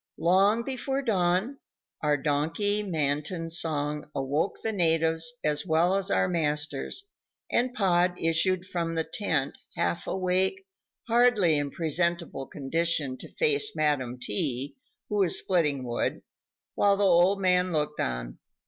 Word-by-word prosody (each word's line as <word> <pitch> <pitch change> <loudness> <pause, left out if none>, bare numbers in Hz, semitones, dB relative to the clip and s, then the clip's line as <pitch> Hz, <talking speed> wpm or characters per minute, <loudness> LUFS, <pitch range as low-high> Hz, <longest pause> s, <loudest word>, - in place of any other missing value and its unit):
Long 195 +6 +3
before 270 +1 -3
dawn, 195 +4 0 0.4
our 150 -1 +2
donkey 160 +9 0
matin 165 -1 -2
song 150 -3 -1
awoke 140 +7 -1
the 225 - 0
natives 165 -3 +2
as 150 -1 0
well 170 +2 +2
as 195 0 -1
our - - +2
masters, 150 - -2 0.4
and 245 +1 +1
Pod 180 -4 +2
issued 175 +3 +1
from 170 -2 -3
the 160 - 0
tent, 160 -5 -2 0.2
half 85 0 -1
awake, 190 - 0 0.4
hardly 230 -8 +4
in 145 -1 -1
presentable 170 -2 -2
condition 150 -1 -1
to - - -10
face 435 -2 0
Madam 130 -5 0
T., 125 +5 -2 0.3
who 210 - -2
was 190 -4 +5
splitting 150 -8 +1
wood, 120 -1 -2 0.5
while 200 -1 +3
the 205 - +1
old 185 +1 +4
man 180 -1 +2
looked 150 -2 -2
on. - - -3
170 Hz, 130 wpm, -27 LUFS, 150-195 Hz, 0.5 s, was